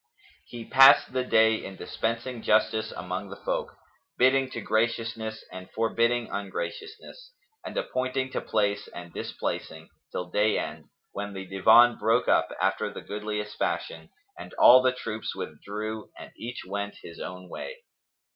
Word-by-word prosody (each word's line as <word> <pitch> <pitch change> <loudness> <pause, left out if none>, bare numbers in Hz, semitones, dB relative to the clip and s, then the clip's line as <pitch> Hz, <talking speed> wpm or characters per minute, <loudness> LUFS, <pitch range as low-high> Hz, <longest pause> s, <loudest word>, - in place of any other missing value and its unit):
He 120 -2 -8
passed 135 -1 +7
the 130 -1 +1
day 110 -2 +3
in 95 - -7
dispensing 115 +4 -3
justice 110 0 +2
among 90 +3 -5
the 100 - -7
folk, - - -3 0.4
bidding 130 +1 +4
to 120 - -5
graciousness 110 0 -1
and 95 0 -9
forbidding 115 +1 +1
ungraciousness 440 - -6 0.3
and - - -7
appointing 130 - -1
to - - -2
place 100 -1 0
and 85 -1 -10
displacing, - - -5 0.2
till 90 0 -5
day 105 +1 +2
end, 75 0 -5 0.3
when 100 0 -5
the 95 -1 -6
Divan 110 +6 +5
broke 115 +4 +2
up, - - +3
after - - 0
the - - -8
goodliest 105 0 -5
fashion, - - -3 0.3
and - - -10
all 130 +1 +8
the 130 0 +3
troops 110 -3 -5
withdrew 110 +1 -6
and - - -10
each 120 +2 -7
went 100 +2 -4
his 85 - -10
own 90 0 -7
way. - - -8
110 Hz, 145 wpm, -27 LUFS, 100-120 Hz, 0.4 s, all